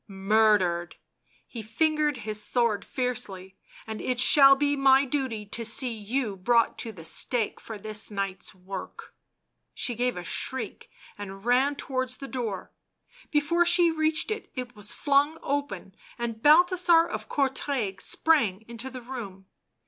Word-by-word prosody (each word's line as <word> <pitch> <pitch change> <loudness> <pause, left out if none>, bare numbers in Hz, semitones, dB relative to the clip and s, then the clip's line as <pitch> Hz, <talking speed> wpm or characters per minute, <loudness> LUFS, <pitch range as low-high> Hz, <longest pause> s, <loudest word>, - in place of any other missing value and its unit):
" - - -52
Murdered 195 -3 +2 0.3
!" - - -51 0.2
He 235 - -7
fingered 300 +6 0
his 215 -1 -3
sword 230 -2 0
fiercely. 205 -7 -4
" - - -19
And 220 -1 -6
it 250 -1 -2
shall 275 +1 +7
be 290 +1 +1
my 275 0 +5
duty 255 -6 -3
to 230 +3 -4
see 240 +3 -1
you 220 0 -3
brought 230 +4 +2
to 230 - -4
the 175 -6 -12
stake 225 +6 -1
for 225 - -8
this 215 +1 -5
night's 195 -2 -4
work." 190 +1 -9 0.6
She 245 - -1
gave 245 -1 -1
a 180 - -5
shriek 260 +8 -4 0.3
and 195 0 -8
ran 260 +4 +3
towards 255 -2 -3
the 275 - -8
door. 230 -8 -5 0.6
Before 320 +4 +2
she 345 0 +4
reached 315 +4 0
it, 435 - -5
it 250 -2 -6
was 210 0 -3
flung 290 +2 +2
open, 285 -8 -3 0.2
and 230 -2 -4
Balthasar 340 +3 +5
of - - -6
Courtrai 265 -7 -1
sprang 230 - +2
into 235 +2 -6
the 255 -1 -9
room. 215 -7 -8
245 Hz, 155 wpm, -27 LUFS, 210-280 Hz, 0.6 s, shall